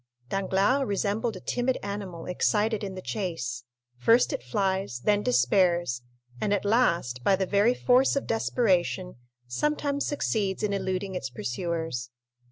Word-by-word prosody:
Danglars 195 +8 +1
resembled 205 +3 -1
a - - -7
timid 250 +6 -1
animal 195 -4 -5
excited 210 +4 +1
in 195 -2 -4
the 185 - -7
chase; 125 - -3 0.3
first 230 - +4
it - - -3
flies, 190 0 -1
then 205 +5 +2
despairs, 125 +1 +2 0.4
and 205 - 0
at 205 0 +1
last, 170 - +1
by 195 - +4
the 190 0 -1
very 205 +6 +3
force 255 +2 +3
of 275 - -1
desperation, 190 - 0 0.3
sometimes 285 - -1
succeeds 210 -9 -1
in 205 -1 0
eluding 190 0 -2
its 160 -8 -3
pursuers. 125 0 -3
195 Hz, 140 wpm, -27 LUFS, 170-220 Hz, 0.4 s, first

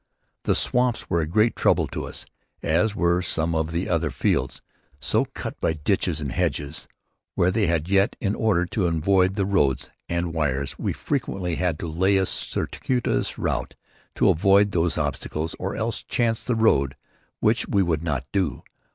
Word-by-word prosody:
The - - +3
swamps 125 -1 0
were 85 - +3
a 75 - -2
great 105 +7 +2
trouble - - +3
to - - -4
us, - - -8 0.4
as 100 +7 +2
were 85 -2 +2
also 90 0 -2
some 80 +1 0
of 80 0 0
the 85 +2 -1 0.3
fields, - - -1 0.4
so - - +1
cut - - -6
up - - -42
by 80 - +2
ditches 80 +1 0
and 70 -3 -3
hedges 75 +3 -2 0.5
were 90 +1 +3
they, 105 0 +1
and 85 -1 0
yet, 100 +2 +3
in 100 -1 0
order 105 -6 +2
to 90 +1 0
avoid 90 +3 +2
the 100 -2 +1
roads 75 -10 +1 0.2
and 85 0 0
the - - -3
wires, 70 -3 -1
we - - -1
frequently 90 -4 -2
had 90 -4 0
to 85 - -5
lay 95 +5 +2
a 95 - +2
circuitous 125 +6 -1
route - - -2 0.4
to - - +4
avoid 100 +4 +4
these 85 -2 +1
obstacles 75 +2 -2
or 95 +1 -3
else 115 +1 -2
chance 115 -1 0
the 125 - 0
road, 70 - +3 0.4
which - - +2
we 100 - +2
would 80 -4 0
not 70 -6 -2
do. 90 -9 -1
85 Hz, 180 wpm, -24 LUFS, 80-100 Hz, 0.5 s, to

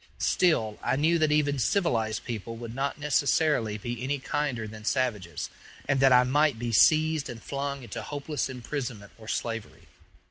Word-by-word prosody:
Still, 115 - +2
I - - +1
knew 160 +4 +2
that 155 -1 +3
even 145 -2 +2
civilized 115 - +1
people 115 -1 -5
would 115 0 -7
not 135 +2 -2
necessarily 145 -6 +1
be 120 +3 -5
any 140 +2 0
kinder 130 -5 -2
than 110 0 -10
savages, 105 - -1 0.4
and 135 -1 +2
that 135 0 +5
I 125 0 +7
might 145 +1 +2
be 120 +1 -3
seized 155 +5 +4
and 115 - -7
flung 140 +1 -4
into 115 -1 -6
hopeless 145 +2 -3
imprisonment 125 -5 -5
or 110 - -12
slavery. 115 -1 -4
130 Hz, 165 wpm, -28 LUFS, 115-145 Hz, 0.4 s, I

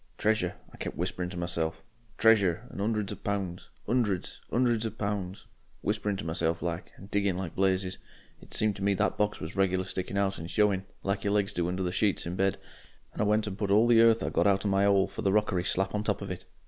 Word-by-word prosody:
'Treasure,' 105 -5 +1 0.2
I - - -12
kep' - - -5
whisperin' 90 -1 -2
to 90 - -7
myself, 85 -2 -2 0.3
'Treasure' 110 -2 +4
and - - -6
''undreds 105 -1 0
of 105 - -8
pounds, 95 -4 -3 0.2
'undreds, 110 -7 0
'undreds 120 -2 +2
of 110 -1 -4
pounds.' 100 -2 -3 0.4
Whispering 105 -1 -1
to 100 - -6
myself 80 0 0
like, 85 +1 -3
and 95 - -13
digging 100 -3 +1
like 90 -3 -4
blazes. 95 -1 +1 0.4
It - - -16
seemed 110 -2 +1
to 95 - -5
me 100 0 +3
the 105 +2 +2
box 105 0 -1
was 80 +3 -6
regular 95 -1 +2
sticking 95 +1 -4
out 100 -1 0
and 80 +1 -6
showing, 100 0 +2 0.2
like 100 +1 -1
your 100 -1 +1
legs 105 0 +1
do 85 -2 0
under 90 +1 -2
the 90 - -1
sheets 100 +1 +1
in 85 +1 -3
bed, 95 +1 +1 0.6
and - - -3
I - - +3
went 105 +1 +2
and 100 -1 -5
put 100 - -1
all 105 +3 +5
the 120 -1 +6
earth 115 -1 +5
I'd - - -3
got - - +3
out 100 0 +2
of 100 - +2
my 95 +1 +3
'ole 100 -1 +4
for - - -7
the 100 -3 +2
rockery 100 -3 +2
slap 95 0 0
on 105 0 -1
top - - -1
of - - -5
it. - - -6
100 Hz, 235 wpm, -29 LUFS, 90-105 Hz, 0.6 s, the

